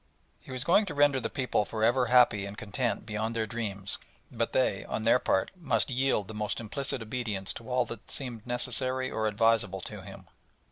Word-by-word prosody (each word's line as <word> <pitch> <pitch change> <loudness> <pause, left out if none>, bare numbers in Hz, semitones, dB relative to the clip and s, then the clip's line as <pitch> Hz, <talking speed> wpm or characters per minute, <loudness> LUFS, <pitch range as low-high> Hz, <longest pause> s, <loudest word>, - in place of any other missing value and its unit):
He - - -18
was 130 0 -1
going 190 +6 +4
to 150 - -5
render 145 -2 +4
the - - -3
people 125 -5 0
for 110 +1 -4
ever 125 +2 +3
happy 120 -5 +5
and 100 +1 -8
content 110 +3 -2
beyond 110 +1 -3
their 110 -1 0
dreams, 100 -3 -4 0.3
but - - -1
they, - - +1
on - - -3
their 115 +3 +5
part, 95 - +1
must 135 -8 0
yield 130 -5 +1
the 110 - -8
most 105 -1 -2
implicit 125 +2 -1
obedience 110 -4 -3
to 115 - -10
all 125 0 +2
that 115 - -9
seemed 120 -4 -4
necessary 130 +1 +1
or 110 0 0
advisable 105 -3 +2
to - - -7
him. - - -11
115 Hz, 195 wpm, -29 LUFS, 105-130 Hz, 0.3 s, happy